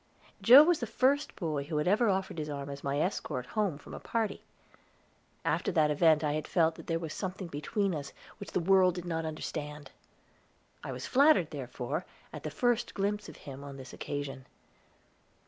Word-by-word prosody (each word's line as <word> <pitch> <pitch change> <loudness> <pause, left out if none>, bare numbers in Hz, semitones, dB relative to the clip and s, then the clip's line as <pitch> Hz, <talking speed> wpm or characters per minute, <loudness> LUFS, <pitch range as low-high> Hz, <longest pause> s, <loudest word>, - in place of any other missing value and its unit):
Joe 260 +5 +10
was 340 0 +3
the 235 - -3
first 265 +6 +1
boy 155 -6 -2
who 155 +1 -3
had 150 - 0
ever 215 +4 +4
offered 190 -3 -1
his 150 0 -4
arm 140 -1 -5
as 140 - -8
my 140 +1 -1
escort 150 -7 -2
home 200 - -1
from - - -12
a - - -6
party. 225 -3 -2 1.0
After - - +1
that 155 -3 +3
event 155 +1 +4
I 150 - +1
had 155 0 -3
felt 165 -2 +3
that - - -13
there 165 - +1
was 165 -2 -5
something 190 -1 -4
between 175 +5 -1
us 145 -3 -5 0.3
which - - -8
the - - +2
world 185 0 +4
did 175 -1 -5
not 165 -2 -2
understand. 150 -1 -6 0.9
I - - -5
was - - -5
flattered, 285 +4 +4
therefore, - - -4 0.3
at - - -6
the - - -4
first 240 -1 0
glimpse 205 +1 -1
of - - -12
him 140 -1 -8
on 140 -1 -8
this 130 0 -10
occasion. 140 -2 -5
165 Hz, 190 wpm, -31 LUFS, 150-205 Hz, 1.0 s, Joe